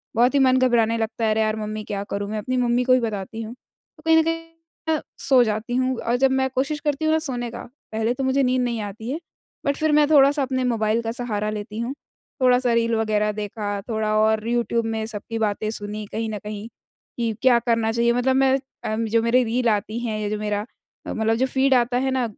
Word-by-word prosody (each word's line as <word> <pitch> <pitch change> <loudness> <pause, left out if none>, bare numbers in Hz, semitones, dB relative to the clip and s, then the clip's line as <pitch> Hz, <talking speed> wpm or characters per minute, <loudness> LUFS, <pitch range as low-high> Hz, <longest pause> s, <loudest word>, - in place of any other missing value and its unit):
बहुत 245 +3 +4
ही 285 - +3
मन 260 -1 +4
घबराने 235 -3 +3
लगता 225 0 -3
है, 220 - +2
"अरे 220 - +2
यार 215 0 +1
मम्मी, 215 0 -4
क्या 200 -1 -4
करूँ 200 0 -3
मैं?" 215 - -3
अपनी 255 +4 -2
मम्मी 245 0 +2
को 255 0 +4
ही 255 - +5
बताती 220 -1 -4
हूँ। 225 +1 -6 0.4
तो - - -17
कहीं 325 0 +5
न 320 - +5
कहीं 330 0 -3 0.5
अ, 305 - -1 0.2
सो 260 -3 +4
जाती 220 +2 -2
हूँ, 255 0 +1
और 235 - 0
जब 265 0 +3
मैं 265 0 +1
कोशिश 275 +3 -1
करती 295 +1 0
हूँ 315 - +3
ना 320 - +3
सोने 245 -6 -3
का, - - -7 0.3
पहले 225 +2 0
तो 265 +2 -4
मुझे 265 +1 +2
नींद 255 0 +2
नहीं 235 -3 -1
आती 215 +3 -6
है। 310 - -3 0.5
बट 280 0 +1
फिर 315 0 +1
मैं 300 0 +5
थोड़ा-सा 285 -1 +5
अपने 260 -1 -1
मोबाइल 225 -2 +1
का 225 0 -3
सहारा 215 -3 -2
लेती 210 +1 -5
हूँ, 240 +4 -2 0.5
थोड़ा-सा 250 -1 +4
रील 230 0 +2
वगैरह 215 -1 +1
देखा, 205 -1 -4
थोड़ा 215 -1 0
और 220 0 +2
यूट्यूब 235 -1 0
में 220 -1 -2
सबकी 225 +1 -5
बातें 215 0 -1
सुनी 210 0 -4
कहीं 225 0 -2
न 210 -1 -4
कहीं 210 +1 -6 0.5
कि 230 -2 0
क्या 255 -2 +5
करना 230 -2 +1
चाहिए। 235 +1 +2
मतलब 250 +2 +1
मैं 265 0 +4 0.3
अ, 215 - -1
जो 225 0 +1
मेरी 245 +2 +3
रील 240 +1 +1
आती 215 +2 -1
हैं 215 -2 -2
या 210 -1 -2
जो 215 - -2
मेरा 210 0 -2 0.4
अ, - - -4
मतलब 220 0 +1
जो 260 - +2
फीड 265 +1 +2
आता 245 0 +2
है 265 +1 0
ना 260 -1 +1
230 Hz, 235 wpm, -23 LUFS, 215-255 Hz, 0.5 s, ही